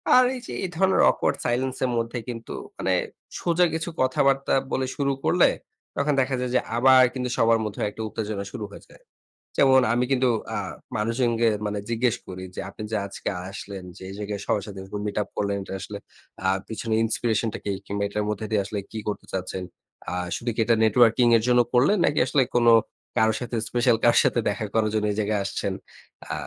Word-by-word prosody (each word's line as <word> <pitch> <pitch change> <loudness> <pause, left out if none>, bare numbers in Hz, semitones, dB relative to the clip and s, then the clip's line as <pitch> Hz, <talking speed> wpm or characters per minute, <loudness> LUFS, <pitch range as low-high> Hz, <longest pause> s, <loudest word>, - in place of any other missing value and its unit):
আর 255 - +8
এই - - -5
যে - - -7
এই 185 - -2
ধরনের 190 +3 +3
awkward - - 0
silence 130 +2 0
এর 125 - -1
মধ্যে 115 +1 -2
কিন্তু 115 -2 -6 0.2
মানে - - 0 0.5
সোজা 175 +1 +3
কিছু 160 +1 -2
কথাবার্তা 135 +1 +2 0.2
বলে 130 - 0
শুরু 140 -1 0
করলে, - - +5 0.5
তখন 145 +1 +1
দেখা 130 0 0
যায় 125 -1 -2
যে - - +6 0.2
আবার 130 +1 +7
কিন্তু 125 -1 -3
সবার 115 0 +4
মধ্যে 105 - -5
একটা 110 - -8
উত্তেজনা 105 -2 -4
শুরু 115 -5 -5
হয়ে - - -11
যায়। - - -19 0.5
যেমন 130 -1 +6
আমি 120 +1 +2
কিন্তু 130 -1 +3 0.3
আ - - -1 0.4
মানুষজনকে 115 +1 +1 0.2
মানে 105 0 -2
জিজ্ঞেস 120 0 +1
করি 95 0 -7
যে, - - -5
আপনি 105 - -8
যে 110 - +1
আজকে 100 - -5 0.2
আসলেন 100 -1 -7
যে - - -14
এই 95 - -7
জায়গায় 105 -1 -4
সবার 105 - 0
সাথে 100 -2 -8
এরকম 95 +2 -6
মিট 105 - -4
আপ - - -5
করলেন 100 -1 0
এটা 95 - -8
আসলে 100 +2 -6 0.5
আ - - +4 0.2
পিছনে 110 0 -3
inspiration 115 0 0
টা - - -5
কি? 100 - 0
কিংবা 100 +1 -2
এটার 105 +1 -2
মধ্যে 105 +1 -3
দিয়ে 105 -2 +3
আসলে 100 +1 -3
কী 110 - -4
করতে 105 - -3
চাচ্ছেন? 95 0 -3 0.5
আ - - -3 0.2
শুধু 120 - -3
কি - - -5
এটা 115 - +4
নেটওয়ার্কিং 115 +2 +5
এর 110 - -2
জন্য 125 0 +5
করলেন? 135 +12 +4
নাকি 145 - +1
আসলে 135 +1 +3
কোনো 120 -1 +6 0.5
কারো 110 0 +4
সাথে 120 -1 -4
স্পেশাল 120 -1 +3
কারো 120 - +5
সাথে - - +2
দেখা 105 +1 -2
করার 110 -1 +2
জন্য 110 -1 +1
এই 100 - -4
জায়গায় 105 -1 0
আসছেন। 100 0 -2 0.6
আ - - -1
115 Hz, 205 wpm, -25 LUFS, 105-125 Hz, 0.6 s, আর